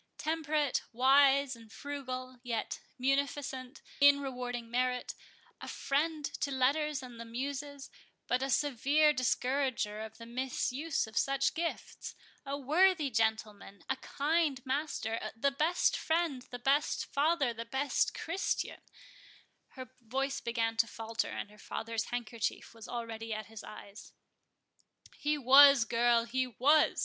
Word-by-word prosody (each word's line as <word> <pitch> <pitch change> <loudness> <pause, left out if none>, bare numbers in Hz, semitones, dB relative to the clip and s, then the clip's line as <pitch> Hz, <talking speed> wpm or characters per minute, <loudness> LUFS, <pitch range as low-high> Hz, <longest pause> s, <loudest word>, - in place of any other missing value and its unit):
Temperate, 305 -3 0
wise, 270 +2 +4
and 225 -2 -16
frugal, 255 -3 -6
yet 235 -3 -3 0.2
munificent 275 0 -2 0.2
in 285 0 +7
rewarding 245 -3 -5
merit—a 250 0 -4
friend 300 +2 -1
to 285 - -3
letters 280 +2 +1
and 245 -2 -10
the - - -5
muses, 275 +4 -5 0.3
but 250 +1 0
a 270 - -1
severe 290 +3 +3
discourager 255 -4 0
of 220 0 -8
the 230 - -10
misuse 260 +5 -2
of 220 -1 -13
such 275 +3 +1
gifts—a 315 -3 -6
worthy 310 +1 +3
gentleman—a 220 -1 -1
kind 295 -2 0
master—the 260 -3 -1
best 310 +6 +2
friend, 320 -6 -1
the 245 - -6
best 275 +4 +1
father, 285 -3 +1
the 230 0 -6
best 265 +4 0
Christian"—Her 325 -6 -6
voice 270 +4 -2
began 230 -1 -1
to 230 - +3
falter, 225 0 -3
and 205 - -6
her 210 - -17
father's 230 +1 -3
handkerchief 235 -2 -3
was 225 -1 -11
already 225 -2 -4
at 215 0 -5
his 220 +1 -10
eyes. 205 0 -11 1.0
"He 300 +1 0
was, 275 -1 +8
girl, 235 0 +3
he 255 +2 -1
was!" 280 +6 +3
260 Hz, 120 wpm, -32 LUFS, 230-285 Hz, 1.0 s, was